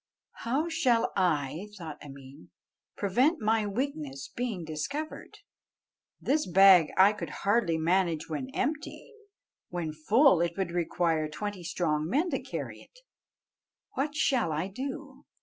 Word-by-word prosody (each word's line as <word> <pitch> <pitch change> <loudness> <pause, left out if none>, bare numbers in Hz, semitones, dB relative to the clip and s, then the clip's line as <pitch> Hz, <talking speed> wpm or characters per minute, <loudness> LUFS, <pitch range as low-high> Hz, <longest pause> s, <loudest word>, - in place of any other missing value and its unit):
"How 280 +7 +1
shall 250 -8 +2
I," 165 -1 0
thought 160 -5 -8
Ameen, 140 +2 -12 0.5
"prevent 250 - +2
my 220 -1 +1
weakness 275 +5 -4
being 225 -9 -4
discovered? 285 - -5 0.8
This 300 +2 0
bag 185 -3 +7
I 195 +3 +6
could 210 - -6 0.2
hardly 200 -5 +2
manage 165 -1 +1
when 145 -5 -4
empty; 305 - -4 0.6
when 170 -3 -4
full, 205 - +4
it 170 +1 -1
would 190 -3 -2
require 165 -2 0
twenty 205 +2 -5
strong 160 -2 -1
men 315 - +1
to - - -1
carry - - -6
it; - - -20 0.9
what 290 +3 -2
shall 255 - +1
I 155 +5 -2
do? 265 +7 -7
195 Hz, 130 wpm, -29 LUFS, 160-265 Hz, 0.9 s, bag